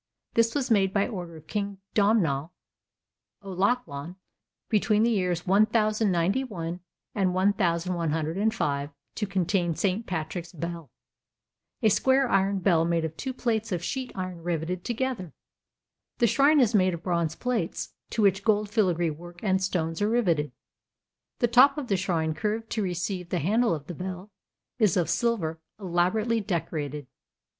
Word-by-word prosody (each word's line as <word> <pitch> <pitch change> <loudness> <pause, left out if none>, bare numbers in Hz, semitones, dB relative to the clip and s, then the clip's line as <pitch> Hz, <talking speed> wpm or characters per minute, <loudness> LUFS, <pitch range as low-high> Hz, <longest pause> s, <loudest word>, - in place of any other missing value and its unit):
This 230 +2 +2
was 265 -4 -1
made 195 -3 +3
by 200 - +3
order 175 -7 -6
of 155 - -15
King 200 -2 -3 0.2
Domnall 175 -8 +2 0.9
O'Lachlainn 185 - -1 0.5
between 215 0 +2
the 235 - +3
years 180 -5 0
1091 205 -2 +1 0.3
and 190 -3 +1
1105 170 -3 0 0.2
to 210 - -2
contain 180 -3 0
St. 200 +5 -1
Patrick's 170 +1 -4
Bell, 170 -3 -6 0.9
a 220 - +6
square 265 +5 +3
iron 195 -2 +2
bell 175 -4 +3
made 165 -1 +1
of 160 0 -5
two 265 - -4
plates 225 -4 -1
of 175 -2 -2
sheet 260 +6 -3
iron 185 -2 -5
riveted 175 +1 -2
together. 240 - -3 0.8
The 240 - +3
shrine 275 +7 +4
is 240 -4 +3
made 185 -3 +3
of 170 - -11
bronze 170 -3 0
plates, 235 -8 -2 0.2
to 220 - 0
which 195 0 +3
gold 210 -1 +2
filigree 175 -7 +2
work 175 +4 -11
and 190 -2 +2
stones 165 -3 -1
are 205 - +2
riveted. 175 -11 +1 0.9
The 240 - +2
top 255 +5 +6
of 280 -4 -4
the 200 - +3
shrine, 170 -4 0
curved 220 +5 -3
to 220 - 0
receive 180 -1 -3
the 180 - 0
handle 210 - +2
of 145 -2 -8
the 175 - -6
bell, 185 +4 -6 0.5
is 210 -6 +3
of 175 - +1
silver 185 -10 0 0.2
elaborately 195 +5 +1
decorated. 155 -6 -3
190 Hz, 145 wpm, -27 LUFS, 170-220 Hz, 0.9 s, a